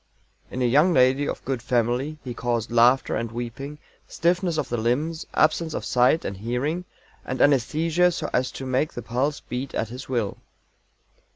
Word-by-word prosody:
"'In 130 Hz, -, -2 dB
a -, -, +3 dB
young 150 Hz, +9 st, +4 dB
lady 130 Hz, +2 st, +4 dB
of -, -, -6 dB
good 130 Hz, -3 st, -2 dB
family' 125 Hz, +5 st, 0 dB
he 125 Hz, -, -5 dB
caused 120 Hz, -1 st, -2 dB
laughter 120 Hz, +3 st, +4 dB
and 115 Hz, 0 st, -3 dB
weeping, 120 Hz, +5 st, -6 dB, 0.3 s
stiffness 175 Hz, 0 st, 0 dB
of -, -, -1 dB
the 120 Hz, -, -2 dB
limbs, 145 Hz, +9 st, -1 dB
absence 160 Hz, 0 st, +2 dB
of -, -, -4 dB
sight 125 Hz, +6 st, +3 dB
and 100 Hz, -, -4 dB
hearing, 130 Hz, -, -2 dB, 0.4 s
and 130 Hz, -, -4 dB
anæsthesia 160 Hz, +6 st, +3 dB
so -, -, -3 dB
as 125 Hz, 0 st, +1 dB
to 135 Hz, -, -6 dB
make 130 Hz, +4 st, 0 dB
the 120 Hz, -, -6 dB
pulse 130 Hz, +6 st, -1 dB
beat 130 Hz, +2 st, -5 dB
at 110 Hz, -, -1 dB
his 130 Hz, +3 st, -8 dB
will." 115 Hz, -6 st, -1 dB
130 Hz, 175 wpm, -24 LUFS, 120-150 Hz, 0.4 s, young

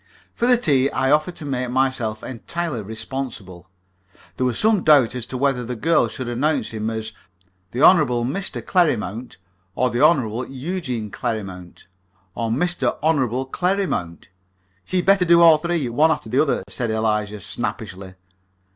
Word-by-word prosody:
For 240 Hz, -, 0 dB
the 250 Hz, -1 st, +5 dB
tea 140 Hz, -, +2 dB
I 130 Hz, 0 st, 0 dB
offered 155 Hz, +4 st, +2 dB
to 155 Hz, -, -8 dB
make 130 Hz, -3 st, -2 dB
myself 125 Hz, -4 st, -1 dB
entirely 135 Hz, +2 st, -4 dB
responsible. 110 Hz, -4 st, -6 dB, 0.7 s
There 130 Hz, -, 0 dB
was 120 Hz, -, -2 dB
some 215 Hz, -4 st, +3 dB
doubt 140 Hz, -7 st, +5 dB
as 125 Hz, -2 st, -5 dB
to 130 Hz, -, -5 dB
whether 135 Hz, -2 st, 0 dB
the 125 Hz, +1 st, -5 dB
girl 165 Hz, +8 st, +2 dB
should 130 Hz, -, -6 dB
announce 145 Hz, +6 st, -1 dB
him 110 Hz, 0 st, -3 dB
as 110 Hz, -1 st, -5 dB, 0.6 s
the 125 Hz, +7 st, -2 dB
Hon. 185 Hz, -, +8 dB, 0.3 s
Mr. 190 Hz, +10 st, -4 dB
Clerrimount, 125 Hz, -, 0 dB, 0.4 s
or 125 Hz, 0 st, +1 dB
the 120 Hz, +3 st, -1 dB
Hon. 130 Hz, -7 st, +2 dB
Eugene 130 Hz, -, -4 dB
Clerrimount, 95 Hz, -5 st, -5 dB, 0.5 s
or 115 Hz, +1 st, -3 dB
Mr. 175 Hz, +10 st, 0 dB
Hon. 135 Hz, -5 st, +1 dB
Clerrimount. 180 Hz, -, -2 dB, 0.6 s
"She'd 185 Hz, -1 st, -1 dB
better 195 Hz, -1 st, +4 dB
do 170 Hz, -1 st, +5 dB
all 165 Hz, -2 st, +7 dB
three, 170 Hz, -4 st, -1 dB
one 145 Hz, +7 st, +3 dB
after 120 Hz, -, -2 dB
the 130 Hz, -, +3 dB
other," 145 Hz, -10 st, 0 dB
said 110 Hz, +4 st, -3 dB
Eliza, 105 Hz, -1 st, -1 dB
snappishly. 95 Hz, 0 st, -5 dB
130 Hz, 155 wpm, -21 LUFS, 110-160 Hz, 0.7 s, Hon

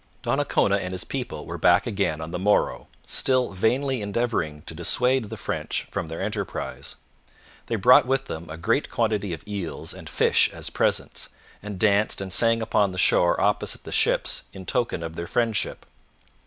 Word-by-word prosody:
Donnacona 100 Hz, 0 st, +2 dB
and 95 Hz, -2 st, -4 dB
his 90 Hz, -2 st, -4 dB
people -, -, -5 dB
were -, -, -6 dB
back 90 Hz, +3 st, +4 dB
again 95 Hz, -9 st, -1 dB
on 80 Hz, +1 st, -6 dB
the 90 Hz, -, -3 dB
morrow, 105 Hz, +2 st, +1 dB, 0.2 s
still 130 Hz, -4 st, +1 dB
vainly 125 Hz, +6 st, 0 dB
endeavouring 100 Hz, -8 st, -2 dB
to 80 Hz, -, -8 dB
dissuade 125 Hz, +9 st, +2 dB
the 110 Hz, +1 st, -7 dB
French -, -, -3 dB
from -, -, -3 dB
their 80 Hz, +3 st, -5 dB
enterprise. 105 Hz, +1 st, -4 dB, 0.7 s
They 115 Hz, -, -1 dB
brought 125 Hz, +5 st, +6 dB
with 135 Hz, 0 st, +1 dB
them 80 Hz, +1 st, -7 dB
a 80 Hz, -, -7 dB
great 115 Hz, -, 0 dB
quantity 105 Hz, -4 st, 0 dB
of 85 Hz, +5 st, -7 dB
eels 100 Hz, -5 st, -5 dB
and -, -, -10 dB
fish -, -, +3 dB
as -, -, -6 dB
presents, -, -, -1 dB, 0.3 s
and 105 Hz, -1 st, -6 dB
danced 105 Hz, +1 st, +2 dB
and 95 Hz, -1 st, -2 dB
sang 115 Hz, -1 st, +4 dB
upon 105 Hz, -2 st, +2 dB
the -, -, -7 dB
shore 85 Hz, -1 st, +3 dB
opposite 105 Hz, +1 st, 0 dB
the -, -, -9 dB
ships -, -, +1 dB
in 95 Hz, -1 st, -9 dB
token 120 Hz, -9 st, -1 dB
of 80 Hz, 0 st, -6 dB
their 85 Hz, 0 st, -5 dB
friendship. 115 Hz, 0 st, -1 dB
100 Hz, 175 wpm, -25 LUFS, 90-115 Hz, 0.7 s, brought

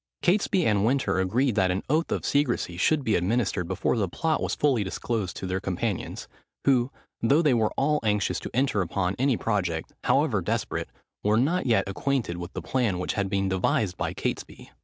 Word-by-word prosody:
Catesby 185 Hz, -1 st, +2 dB
and 100 Hz, -2 st, +2 dB
Winter 130 Hz, -4 st, +1 dB
agreed 115 Hz, +8 st, +1 dB
that 95 Hz, -3 st, +2 dB
an 90 Hz, +2 st, -1 dB
oath 160 Hz, +4 st, +1 dB
of -, -, -1 dB
secresy 130 Hz, -11 st, +1 dB
should 145 Hz, -, +2 dB
be 110 Hz, -, +1 dB
administered 95 Hz, -1 st, 0 dB
before 95 Hz, +6 st, 0 dB
the 100 Hz, -4 st, 0 dB
plot 160 Hz, -, 0 dB
was -, -, -1 dB
fully 135 Hz, -7 st, +2 dB
disclosed 100 Hz, 0 st, -3 dB
to -, -, -5 dB
their 95 Hz, +1 st, -1 dB
companions; 95 Hz, +2 st, -3 dB, 0.4 s
who, 130 Hz, -2 st, +3 dB, 0.3 s
though 140 Hz, +8 st, +4 dB
they 150 Hz, -5 st, +4 dB
were 110 Hz, -3 st, +2 dB
all 150 Hz, +2 st, +2 dB
anxious 105 Hz, -3 st, 0 dB
to -, -, -6 dB
enter 130 Hz, -5 st, +1 dB
upon 90 Hz, +1 st, -1 dB
any 130 Hz, -2 st, +2 dB
project, 90 Hz, -7 st, -2 dB
however -, -, +2 dB
desperate, -, -, -2 dB, 0.3 s
were 105 Hz, +1 st, +3 dB
not 155 Hz, +7 st, +1 dB
yet 115 Hz, -4 st, +3 dB
acquainted 110 Hz, -2 st, -1 dB
with 85 Hz, +1 st, -6 dB
the -, -, -5 dB
plan 120 Hz, -8 st, 0 dB
which 90 Hz, -, -2 dB
had 100 Hz, -2 st, -1 dB
been 100 Hz, -1 st, 0 dB
devised 95 Hz, 0 st, +1 dB
by -, -, -2 dB
Catesby. -, -, -5 dB
110 Hz, 190 wpm, -26 LUFS, 95-135 Hz, 0.4 s, though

